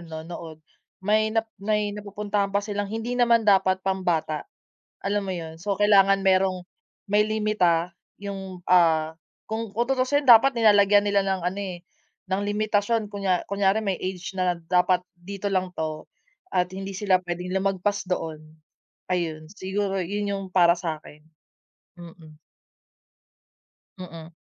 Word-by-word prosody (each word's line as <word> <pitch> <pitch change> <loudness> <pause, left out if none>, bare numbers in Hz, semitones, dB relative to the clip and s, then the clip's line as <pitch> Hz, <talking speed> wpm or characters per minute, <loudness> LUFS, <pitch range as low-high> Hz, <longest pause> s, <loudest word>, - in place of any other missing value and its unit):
nanonood, 165 0 -8 0.5
may 215 +2 +3
nap 225 +1 0 0.2
may 210 0 0
napupuntahan 205 0 -2
pa 200 - +2
silang 205 -1 -3
hindi 225 +3 -4
naman 235 -2 +4
dapat 190 -2 +3
pambata, 170 -5 -1 0.6
alam 205 +1 0
mo - - -1
yun? 165 -2 -6
So, 200 +2 -2
kailangan 195 -1 +4
merong 185 -1 +2 0.4
may 210 +1 +3
limita 190 -6 +1 0.3
yung, 190 -3 -7
ah, 160 -3 +4 0.4
kung 220 -1 -4
kung 235 - +2
tutuusin 270 +2 +1
dapat 245 +3 +7
nilalagyan 205 -2 +5
nila 200 -1 +2
ng 190 -1 -1
ano 185 +3 -2
eh, 180 -3 -6 0.5
ng 195 +2 +1
limitasyon, 210 +1 0
kunya 195 -3 0
kunyari 200 +1 +2
may 195 -3 -2
age 185 -1 -5
na 180 -1 +1
dapat 180 +1 +1
dito 195 +3 -5
lang 185 -1 +1
'to 155 -1 -4 0.4
at 180 0 0
hindi 195 +1 -6
sila 195 -2 +2
pwedeng 180 +1 -4
lumagpas 195 +1 -1
doon, 160 -4 -3 0.7
ayun. 160 -3 -2
Siguro 195 0 -2
yun 205 +3 -2
yung 195 0 -3
para 175 -2 +6
sa'kin, 155 -3 -6 0.8
mm. 165 -3 -13 1.6
Mm. 165 -3 -9
195 Hz, 135 wpm, -25 LUFS, 175-205 Hz, 1.6 s, dapat